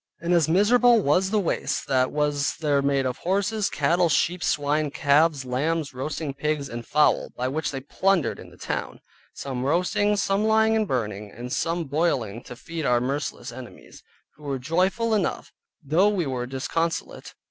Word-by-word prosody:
And 170 +1 -1
as 165 -3 +3
miserable 235 +6 +5
was 185 +2 +2
the 215 +1 +1
waste 190 - -1
that 130 -1 +2
was 145 -1 0
there 145 -3 +1
made 140 -1 +1
of 125 0 -3
horses, 200 +3 0
cattle, 170 +4 +2
sheep, 175 +4 +1
swine, 145 +1 0
calves, 145 0 +2
lambs, 145 +4 -1
roasting 145 +2 -4
pigs, 145 0 -2
and 120 0 -6
fowl 150 +5 +2
(which 135 +5 -2
they 135 - -5
had 135 +1 -9
plundered 190 -8 +1
in - - -11
the - - -18
town), - - -5 0.3
some 130 -2 -4
roasting, 180 +8 +1
some 195 +1 +1
lying 220 0 +3
and 215 -1 +1
burning, 105 - -3
and 120 +5 -7
some 170 +1 -1
boiling 135 - -1
to 125 - -9
feed 165 +5 -6
our 125 -3 +3
merciless 135 +1 -3
enemies; 125 0 -12 0.4
who 150 - -17
were 140 -2 -2
joyful 185 - 0
enough, 205 -4 -1 0.3
though 165 +8 +3
we 195 -5 -1
were 125 -3 -3
disconsolate. 165 +6 -3
150 Hz, 170 wpm, -25 LUFS, 135-180 Hz, 0.4 s, miserable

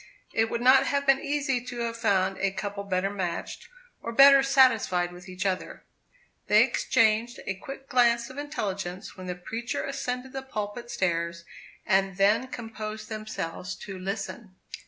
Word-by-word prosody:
It 225 0 +2
would 235 - -2
not 265 +2 +6
have 280 0 0
been 270 -1 +5
easy 280 -3 -1
to 250 -1 -7
have 230 -1 -2
found 195 -4 +1
a 195 - +2
couple 200 +1 -5
better 195 0 0
matched, 180 -4 -4 0.3
or 230 - -4
better 275 +3 +8
satisfied 240 -10 +3
with 180 +1 -12
each 185 +1 -5
other. 190 -1 -2 0.6
They - - +6
exchanged 230 0 +1
a 195 - -1
quick 270 +7 -10
glance 235 -2 +3
of 270 - -8
intelligence 200 -10 -4
when 185 -1 -9
the 180 - -3
preacher 225 +6 -4
ascended 260 -1 -4
the 270 - -4
pulpit 235 -2 -5
stairs, 170 -6 -1 0.4
and 195 -1 +2
then 210 +6 +3
composed 220 -3 -7
themselves 200 -4 -5
to 195 -1 -8
listen. 195 +1 -5
215 Hz, 155 wpm, -27 LUFS, 190-250 Hz, 0.6 s, better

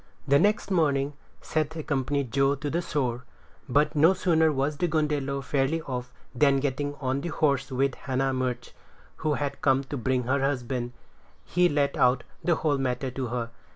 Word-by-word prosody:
The 140 +1 +5
next 205 +1 +1
morning 145 -5 +2 0.3
Seth 155 0 -1
accompanied 140 -4 -1
Joe 140 0 +3
to 145 +1 -4
the 170 - 0
shore; 130 -7 -2 0.5
but 145 +5 +2
no 165 +6 +5
sooner 160 -4 +3
was 145 +1 -1
the 175 - +1
gundelow 150 -3 -1
fairly 140 +4 0
off, 125 -2 -5 0.2
than 140 +1 +3
getting 145 +1 -2
on 135 -1 -2
the 170 - -4
horse 140 -4 0
with 135 +1 +1
Hannah 135 +1 -1
Murch, 130 -1 -2 0.5
who 155 -2 0
had 145 -1 -3
come 135 0 +3
to 140 +1 -5
bring 125 +1 0
her 130 +4 +1
husband, 125 -3 -2 0.5
he 180 0 +3
let 145 -2 +1
out 125 0 +3 0.2
the 175 - +3
whole 150 -3 0
matter 130 0 -1
to 130 0 -3
her. 120 -1 -3
140 Hz, 175 wpm, -27 LUFS, 130-150 Hz, 0.5 s, The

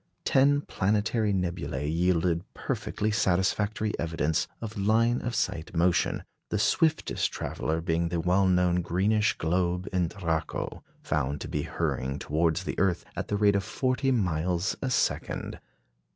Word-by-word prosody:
Ten 140 +2 +4
planetary 105 0 0
nebulæ 85 -7 -2
yielded 85 -1 +2
perfectly 110 +1 -2
satisfactory 105 +2 +1
evidence 80 0 0
of 110 -1 -6
line 115 +4 +2
of 120 -1 -3
sight 85 -2 -2
motion, 85 +1 +2 0.3
the 105 - 0
swiftest 160 - +1
traveller 80 +1 -2
being 85 0 0
the 85 0 -1
well 90 +3 +3
known 90 -1 +3
greenish 105 +5 +1
globe 90 +2 0
in 90 -2 +2
Draco, 80 -3 -3 0.2
found 75 -1 -1
to - - -4
be - - -2
hurrying 70 +2 -2
towards 80 +4 0
the - - -3
earth 90 -3 +1
at - - -3
the 105 - -1
rate 100 -1 +4
of 100 - +1
forty 130 +5 0
miles 90 -4 0
a 135 - -1
second. 125 - -1
90 Hz, 140 wpm, -28 LUFS, 85-105 Hz, 0.3 s, Ten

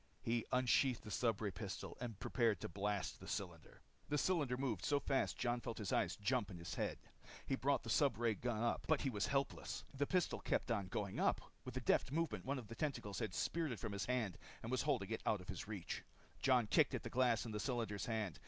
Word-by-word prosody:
He 115 0 0
unsheathed 125 0 +3
the 105 - -7
stubray 110 -1 +1
gun 100 +1 -5
and 115 -5 -5
prepared 115 -4 +2
to - - -2
blast 100 +2 -1
the - - -10
cylinder. 85 -5 -5 0.3
The 150 - +2
cylinder 145 -5 +2
moved 125 -8 -1
so 145 -1 +3
fast 135 -1 +1
Jon 120 0 0
felt 115 - -4
his 105 -5 -2
eyes - - +2
jump 110 0 +1
in 90 - -7
his 85 0 -5
head. - - -1 0.5
He - - -1
brought 140 +2 +2
the - - -3
stubray 120 -6 +3
gun 115 +1 -1
up 120 - 0
but 155 -3 +3
he 135 - 0
was 105 -3 0
helpless. 140 0 -1
The 140 +1 0
pistol 180 -1 +1
kept - - 0
on 100 -4 0
going 100 +1 -2
up. - - +3 0.2
With 130 0 -5
a - - -1
deft 125 - +3
movement, 165 +2 -1
one 140 +2 0
of 125 - -5
the 115 - -7
tentacles 115 -8 -2
had 110 - -2
speared 165 -4 0
it 115 - -4
from 110 - -3
his 100 -1 -2
hand 120 -8 0 0.2
and 115 - -4
was 130 - +2
holding 125 -9 0
it 110 - -1
out 105 - +3
of 90 - -12
his 95 0 -4
reach. 105 -5 -4 0.4
Jon 125 -4 +5
kicked 105 - +4
at - - -3
the - - -5
glass 120 -2 +3
in 115 - -4
the 105 - -2
cylinder's 115 -4 -1
hand. 110 -7 -1
115 Hz, 230 wpm, -40 LUFS, 105-130 Hz, 0.5 s, Jon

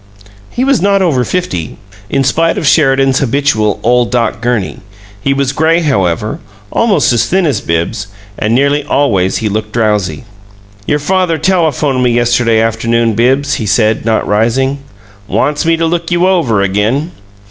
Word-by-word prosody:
He 245 - -2
was 275 -5 +2
not 200 0 +2
over 140 -8 +1
fifty, 105 - -3 0.3
in 135 - +1
spite 165 +5 +1
of - - -2
Sheridan's 135 -3 +3
habitual 125 -6 0
"ole 125 +1 +3
Doc 115 -2 -1
Gurney." 120 -5 -2 0.4
He 140 - 0
was 135 -1 0
gray, 160 +4 +1
however, 105 - -1 0.3
almost 215 - +2
as 120 0 +1
thin 190 0 +1
as 145 - 0
Bibbs, 85 +5 -2 0.3
and 110 +3 -1
nearly 140 +2 +1
always 100 -11 +1
he - - +2
looked 105 +1 -3
drowsy. 105 -8 -1 0.6
"Your 150 - +1
father 180 +2 0
telephoned 155 -6 0
me 125 - +2
yesterday 120 -1 +2
afternoon, 115 +1 0
Bibbs," 135 +5 +1
he 105 - -3
said, 110 +1 +1
not 110 0 0
rising. 125 +6 0 0.5
"Wants 150 +7 -1
me 165 0 +3
to 165 - 0
'look 170 0 -2
you 175 +1 +2
over' 130 - +1
again. 110 - -1
130 Hz, 160 wpm, -12 LUFS, 110-155 Hz, 0.6 s, Sheridan's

